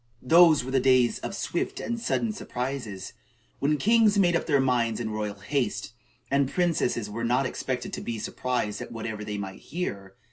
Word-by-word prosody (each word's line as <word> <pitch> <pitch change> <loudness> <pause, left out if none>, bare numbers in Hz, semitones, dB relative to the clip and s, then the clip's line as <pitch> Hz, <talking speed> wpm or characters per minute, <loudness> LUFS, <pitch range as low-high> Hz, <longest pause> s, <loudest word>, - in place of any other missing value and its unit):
Those 165 0 +6
were 130 - -5
days 130 -2 +3
of - - -5
swift - - -2
and 235 0 -3
sudden 230 -1 0
surprises, 125 - -5 0.5
when 150 +2 +2
kings 220 +2 +4
made 175 -3 +4
up - - -1
their 145 -4 +3
minds 120 -4 +1
in 110 -2 -3
royal 105 -1 -3
haste, 115 +2 -2 0.4
and 140 -1 +3
princesses 160 - 0
were 110 +3 -5
not 125 +3 +2
expected 125 0 -3
to - - -4
be 115 -1 -4
surprised 110 0 -2
at - - -7
whatever 110 -2 -5
they 105 0 -4
might 95 -1 -6
hear. 100 - -5
125 Hz, 175 wpm, -27 LUFS, 110-150 Hz, 0.5 s, Those